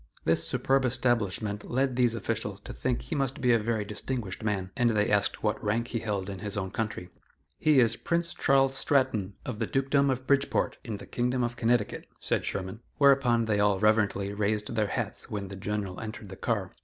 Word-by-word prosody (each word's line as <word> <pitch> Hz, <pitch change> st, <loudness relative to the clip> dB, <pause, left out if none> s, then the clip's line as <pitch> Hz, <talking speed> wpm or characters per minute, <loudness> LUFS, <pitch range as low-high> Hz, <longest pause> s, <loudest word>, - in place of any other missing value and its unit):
This 80 Hz, -, +2 dB
superb 135 Hz, +1 st, +1 dB
establishment 110 Hz, -5 st, 0 dB
led 130 Hz, +1 st, +1 dB
these 120 Hz, -2 st, +3 dB
officials 110 Hz, -2 st, -3 dB
to -, -, -8 dB
think 125 Hz, -2 st, -1 dB
he -, -, -6 dB
must 135 Hz, 0 st, 0 dB
be 125 Hz, -2 st, +3 dB
a 115 Hz, -, +5 dB
very 110 Hz, -1 st, -1 dB
distinguished 105 Hz, -1 st, -4 dB
man, 95 Hz, -3 st, -1 dB
and 120 Hz, -1 st, +3 dB
they 105 Hz, -2 st, +1 dB
asked 100 Hz, 0 st, +1 dB
what 105 Hz, -1 st, 0 dB
rank 115 Hz, +3 st, 0 dB
he 115 Hz, -, -2 dB
held 105 Hz, -4 st, -2 dB
in 95 Hz, -2 st, -5 dB
his 105 Hz, +1 st, -4 dB
own 95 Hz, -2 st, -2 dB
country. 105 Hz, -6 st, -4 dB, 0.5 s
"He 155 Hz, -4 st, +5 dB
is 115 Hz, -2 st, +4 dB
Prince 170 Hz, 0 st, -1 dB
Charles 135 Hz, 0 st, +3 dB
Stratton, 110 Hz, -9 st, +1 dB
of 105 Hz, -, -4 dB
the 115 Hz, -, 0 dB
Dukedom 135 Hz, +4 st, +2 dB
of 130 Hz, 0 st, -1 dB
Bridgeport, 140 Hz, +1 st, +1 dB
in 110 Hz, -4 st, -4 dB
the -, -, -10 dB
Kingdom 125 Hz, +1 st, 0 dB
of 120 Hz, 0 st, -2 dB
Connecticut," 120 Hz, -2 st, 0 dB
said -, -, 0 dB
Sherman. 95 Hz, +3 st, -4 dB, 0.2 s
Whereupon 135 Hz, -5 st, +4 dB
they 105 Hz, -2 st, +1 dB
all 105 Hz, -1 st, +3 dB
reverently 105 Hz, -1 st, +2 dB
raised 105 Hz, +1 st, -1 dB
their 105 Hz, -2 st, +2 dB
hats -, -, -3 dB
when 100 Hz, -2 st, -4 dB
the 100 Hz, -, -7 dB
General 100 Hz, -1 st, -3 dB
entered 110 Hz, -2 st, -7 dB
the 95 Hz, -, -7 dB
car. -, -, -2 dB
110 Hz, 200 wpm, -28 LUFS, 105-125 Hz, 0.5 s, a